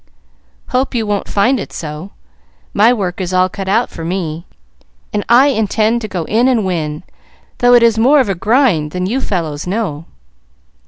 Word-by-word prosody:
"Hope 255 +1 -1
you 225 -2 0
won't 205 -1 -2
find 240 +6 +1
it - - -7
so. 155 +3 -7 0.6
My 220 +4 +5
work 195 -6 -2
is 185 0 -4
all 185 0 +3
cut 195 0 -7
out 225 +5 +1
for 165 - -8
me, 170 -1 -4 0.7
and 205 -1 -1
I 255 +4 +6
intend 220 -1 0
to 215 - -4
go 185 -4 -4
in 225 +9 +1
and 235 -6 +1
win, 155 -4 -3 0.6
though 245 0 +5
it 240 - +5
is 225 -1 +3
more 275 +6 +5
of 260 - +2
a 195 - 0
grind 195 - +1
than 180 0 -2
you 245 +8 -1
fellows 165 - -3
know." 180 -6 -3
205 Hz, 180 wpm, -15 LUFS, 180-235 Hz, 0.7 s, I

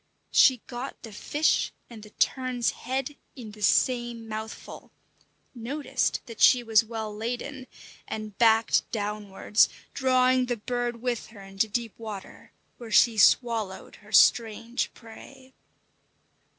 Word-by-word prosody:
She 255 -4 +5
got 250 +2 -7
the 225 - -9
fish 295 +8 0 0.2
and 230 -3 -12
the 215 - -13
tern's 250 +1 0
head 270 +2 -4 0.2
in 235 -6 -9
the 210 0 -14
same 240 +1 +1
mouthful, 220 0 -8 0.6
noticed 265 +5 -2
that 230 -2 -10
she 250 -2 +6
was 225 -1 +4
well 220 -2 -6
laden, 250 +4 -5 0.4
and 215 -2 -6
backed 225 -1 +3
downwards, 210 -1 0 0.2
drawing 255 -1 +2
the 245 -1 -2
bird 240 +1 -3
with 245 -2 -2
her 215 -3 -14
into 195 +2 -2
deep 225 0 -3
water, 215 -4 -9 0.3
where 235 -2 -9
she 230 +1 +5
swallowed 220 -3 +2
her - - -18
strange 230 +1 +3
prey. 260 +3 -14
235 Hz, 125 wpm, -26 LUFS, 215-250 Hz, 0.6 s, she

